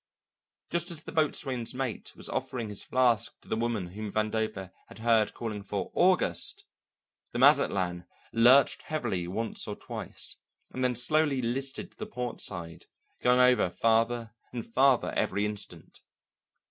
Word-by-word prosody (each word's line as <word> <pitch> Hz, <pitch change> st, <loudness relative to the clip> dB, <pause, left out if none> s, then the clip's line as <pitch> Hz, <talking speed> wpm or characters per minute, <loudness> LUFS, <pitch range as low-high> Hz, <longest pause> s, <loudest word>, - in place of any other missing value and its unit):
Just 170 Hz, +1 st, 0 dB
as 160 Hz, -3 st, +1 dB
the -, -, -8 dB
boatswain's 135 Hz, -6 st, 0 dB
mate 130 Hz, -3 st, -4 dB
was -, -, -7 dB
offering 120 Hz, -4 st, -3 dB
his 105 Hz, -, -4 dB
flask 125 Hz, -4 st, +1 dB
to -, -, -20 dB
the -, -, -1 dB
woman 110 Hz, -5 st, -1 dB
whom 105 Hz, +3 st, -6 dB
Vandover 110 Hz, -3 st, -2 dB, 0.2 s
had -, -, -13 dB
heard 110 Hz, -1 st, +2 dB
calling 110 Hz, -3 st, -4 dB
for 100 Hz, -1 st, -4 dB
"August," 185 Hz, +1 st, +2 dB, 0.7 s
the -, -, -2 dB
Mazatlan 90 Hz, -2 st, +3 dB, 0.3 s
lurched 125 Hz, +4 st, +5 dB
heavily 115 Hz, -, -2 dB
once 110 Hz, +5 st, -2 dB
or -, -, -4 dB
twice, -, -, -5 dB, 0.3 s
and 130 Hz, -, -3 dB
then 125 Hz, -1 st, +2 dB
slowly 145 Hz, +3 st, +2 dB
listed 130 Hz, +3 st, -2 dB
to -, -, -24 dB
the 215 Hz, -, -4 dB
port 125 Hz, -, -5 dB
side, 85 Hz, -3 st, -4 dB, 0.3 s
going 125 Hz, 0 st, +4 dB
over 125 Hz, -6 st, +5 dB
farther 115 Hz, +2 st, +1 dB, 0.2 s
and 120 Hz, -2 st, -5 dB
farther 130 Hz, +2 st, +3 dB
every 100 Hz, +2 st, 0 dB
instant. 105 Hz, -1 st, -6 dB
115 Hz, 145 wpm, -29 LUFS, 105-130 Hz, 0.7 s, lurched